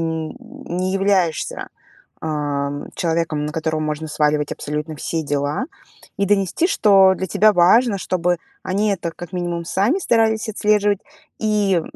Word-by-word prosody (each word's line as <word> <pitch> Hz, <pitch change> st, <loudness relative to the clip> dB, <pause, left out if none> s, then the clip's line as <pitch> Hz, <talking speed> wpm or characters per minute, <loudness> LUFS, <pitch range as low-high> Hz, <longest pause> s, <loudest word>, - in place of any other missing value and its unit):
не 185 Hz, -, -4 dB
являешься, 190 Hz, -5 st, 0 dB, 0.5 s
ам, 145 Hz, -2 st, -3 dB
человеком, 165 Hz, -3 st, -1 dB
на 150 Hz, -, -4 dB
которого 155 Hz, 0 st, -2 dB
можно 155 Hz, +1 st, -3 dB
сваливать 150 Hz, -1 st, 0 dB
абсолютно 150 Hz, +2 st, -4 dB
все 160 Hz, +2 st, -3 dB
дела. 145 Hz, -, -1 dB, 0.5 s
И 200 Hz, -, +1 dB
донести, 200 Hz, -, +2 dB
что 195 Hz, -, +5 dB
для 190 Hz, -, -3 dB
тебя 215 Hz, +5 st, +4 dB
важно, 200 Hz, +6 st, +5 dB
чтобы 180 Hz, -1 st, 0 dB, 0.3 s
они 200 Hz, +3 st, 0 dB
это 175 Hz, -4 st, -2 dB
как 175 Hz, +1 st, -10 dB
минимум 175 Hz, -2 st, -3 dB
сами 200 Hz, -, +1 dB
старались 225 Hz, -, +1 dB
отслеживать 210 Hz, -1 st, +2 dB, 0.4 s
и, 205 Hz, -5 st, +1 dB
175 Hz, 130 wpm, -20 LUFS, 155-205 Hz, 0.5 s, что